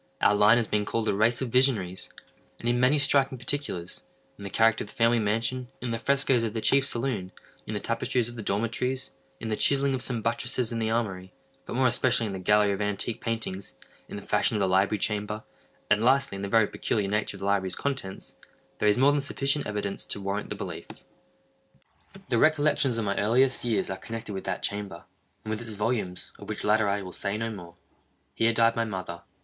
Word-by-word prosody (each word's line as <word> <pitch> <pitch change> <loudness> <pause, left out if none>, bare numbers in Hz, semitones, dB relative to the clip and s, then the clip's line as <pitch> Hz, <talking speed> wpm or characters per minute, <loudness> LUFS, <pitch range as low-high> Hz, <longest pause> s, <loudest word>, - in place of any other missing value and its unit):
Our - - +4
line 105 +3 +6
has 120 - +1
been 105 -1 0
called 115 +1 -2
a - - +2
race 115 +5 +2
of 130 - -3
visionaries; 110 -8 +1 0.5
and 120 - -4
in 120 0 +2
many 130 +4 +4
striking 135 -1 +2
particulars—in 125 -9 -6
the 100 - -5
character 115 +2 +3
of - - -11
the - - -14
family 115 0 +3
mansion—in 115 +4 -2
the 115 - -2
frescos 135 -2 +2
of 115 -1 -3
the - - 0
chief 135 +4 +3
saloon—in 115 -8 -5
the - - -1
tapestries 120 -2 -1
of 120 - -9
the 115 - -6
dormitories—in 125 +4 -3
the 110 - 0
chiselling 140 +3 +2
of 130 - -2
some 120 -4 -2
buttresses 120 +1 -1
in 115 - -2
the 110 -1 0
armory—but 100 -2 -5
more 130 +1 +2
especially 120 -1 +3
in 100 - -4
the 95 - -4
gallery 105 +2 +3
of 100 - -2
antique 105 +2 -1
paintings—in 110 -4 -6
the - - -7
fashion - - +1
of - - 0
the 100 - +2
library 95 +3 +2
chamber—and, 105 0 -3
lastly, 135 -2 +3
in 100 - -6
the 100 - -3
very 110 +1 +4
peculiar 105 -1 -1
nature 105 +2 -1
of - - -14
the - - -3
library's 95 -2 +1
contents—there 105 -4 -4
is 105 - +3
more 135 +3 +5
than 145 0 +1
sufficient 140 +1 0
evidence 100 -2 -3
to - - -3
warrant 100 +1 -3
the - - -3
belief. - - -6 1.4
The 120 -3 +2
recollections 150 -4 +3
of 115 - -1
my 100 0 -1
earliest 125 +6 +3
years 115 -5 0
are 95 - -3
connected 110 +1 -7
with 95 - -5
that 95 -1 -3
chamber, 100 -4 -3 0.4
and 110 - -3
with 110 +1 -2
its 115 -2 -6
volumes—of 105 -4 -3
which - - -4
latter 105 0 +3
I 100 0 -1
will 90 - -8
say 100 +3 -3
no 115 +1 -2
more. 85 -5 -10 0.6
Here 115 0 +2
died 115 0 +3
my 115 - +1
mother. 95 -5 -5
110 Hz, 200 wpm, -27 LUFS, 100-125 Hz, 1.4 s, line